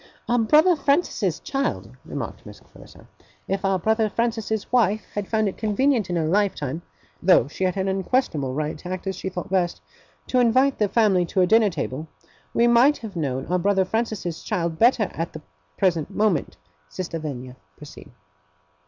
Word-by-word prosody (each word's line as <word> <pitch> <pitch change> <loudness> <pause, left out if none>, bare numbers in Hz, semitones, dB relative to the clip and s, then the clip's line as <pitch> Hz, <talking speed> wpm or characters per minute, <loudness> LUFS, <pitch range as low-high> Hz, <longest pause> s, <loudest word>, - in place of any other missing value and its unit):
'Our 240 0 +2
brother 310 +10 +5
Francis's 280 - 0
child,' 275 0 -3
remarked - - -6
Miss - - -12
Clarissa. - - -17 0.4
'If 195 0 -2
our 195 -1 +2
brother 220 +4 +1
Francis's 225 -2 -2
wife 220 -4 +2
had 205 -2 -3
found 220 -1 +1
it 195 - -5
convenient 220 0 +1
in 175 - -1
her 165 -2 0
lifetime 170 -5 0 0.4
(though 180 -8 +5
she 185 +6 -3
had 185 +1 -1
an 190 0 -1
unquestionable 190 - 0
right 155 +1 -2
to 180 - -8
act 185 0 -5
as 190 -1 -2
she 190 - -4
thought 180 -1 -6
best) 180 -3 0 0.5
to 255 - +1
invite 255 +3 +3
the 210 -2 +2
family 200 -4 +3
to 185 - +1
her - - +5
dinner 220 +2 +4
table, 155 -2 -4 0.4
we 235 - +3
might 240 +5 +5
have 215 -4 -9
known 135 -5 -2
our 180 +2 0
brother 195 +1 +2
Francis's 210 -5 -3
child 170 -2 -2
better 235 -3 +4
at 165 +1 -4
the 155 - -8 0.4
present 170 -6 +1
moment. 210 -8 0 0.3
Sister 175 -2 -5
Lavinia, 130 -5 -6 0.2
proceed. 150 - -12
195 Hz, 175 wpm, -23 LUFS, 170-225 Hz, 0.5 s, brother